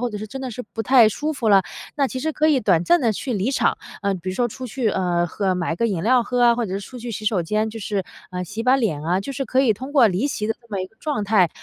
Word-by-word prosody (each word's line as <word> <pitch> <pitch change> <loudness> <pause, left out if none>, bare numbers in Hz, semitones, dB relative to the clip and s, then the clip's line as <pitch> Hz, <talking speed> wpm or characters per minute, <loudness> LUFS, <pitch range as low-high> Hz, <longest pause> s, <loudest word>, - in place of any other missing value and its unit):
或 245 -1 -1
者 210 - -5
是 215 - -6
真 265 +5 -7
的 255 - -4
是 250 +2 -6
不 225 - -2
太 245 -3 +6
舒 300 +8 -2
服 245 -7 -1
了， 195 -2 +6 0.3
那 280 -2 +2
其 255 - -5
实 315 +4 -1
可 310 +1 +1
以 285 -5 +3
短 175 -5 +2
暂 345 - +4
地 235 -4 +2
去 255 +5 -4
离 210 +3 0
场。 275 - +1 0.2
呃， 200 0 +1
比 185 +1 -7
如 185 - -2
说 245 +2 +1
出 255 +3 -7
去 235 -2 -1
呃， 175 -2 0
喝 190 +2 -1
买 170 -2 -1
个 230 - +1
饮 185 -6 -2
料 245 +2 +4
喝 245 +1 0
啊， 235 -1 +6
或 235 -2 -1
者 190 - -4
是 200 - -2
出 250 +5 -10
去 235 0 -6
洗 215 0 -6
手 205 -5 +1
间， 215 +5 -1
就 225 - -7
是 195 -2 -2 0.3
呃， 180 0 -4
洗 210 +6 -5
把 255 +2 +4
脸 195 - -1
啊， 175 +4 +1
就 275 +8 -5
是 270 0 -3
可 260 - +2
以 230 -5 +4
通 260 +7 -8
过 250 -7 +6
离 190 +9 0
席 215 -7 -3
的 225 - +1
这 235 - -23
么 200 -3 -3
一 185 - -5
个 220 - -28
状 290 -9 -2
态， 195 -5 +4
220 Hz, 340 characters per minute, -22 LUFS, 195-255 Hz, 0.3 s, 太